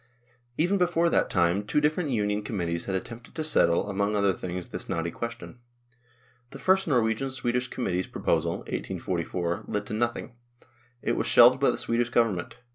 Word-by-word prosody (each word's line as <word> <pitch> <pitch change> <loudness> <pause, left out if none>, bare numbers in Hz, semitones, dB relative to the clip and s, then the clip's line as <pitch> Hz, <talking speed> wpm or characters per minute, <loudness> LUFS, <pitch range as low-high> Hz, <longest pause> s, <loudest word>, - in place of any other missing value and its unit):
Even 185 +5 +2
before 170 -1 +2
that - - +2
time 85 +4 +2
two 105 - +1
different 155 +2 0
Union 105 -3 0
com 105 0 -4
mittees 85 -2 -2
had 95 - -2
attempted 115 +5 -7
to 160 - -2
settle, 85 - +3
among 100 +1 -1
other 100 -2 +2
things, 90 0 -6
this - - -7
knotty 85 0 -2
question. 120 +3 -7 0.9
The - - -10
first 190 0 +2
Norwegian 120 -1 +1
Swedish 125 -1 -1
Committee's 95 -8 -2
proposal 85 0 0
(1844) 85 -1 -3
led 105 0 -2
to - - -6
nothing; 120 +1 -2 0.7
it 115 - 0
was - - -1
shelved 125 +2 +7
by 140 - +4
the - - 0
Swedish 120 +1 0
Government. 115 -7 0
115 Hz, 170 wpm, -27 LUFS, 95-130 Hz, 0.9 s, shelved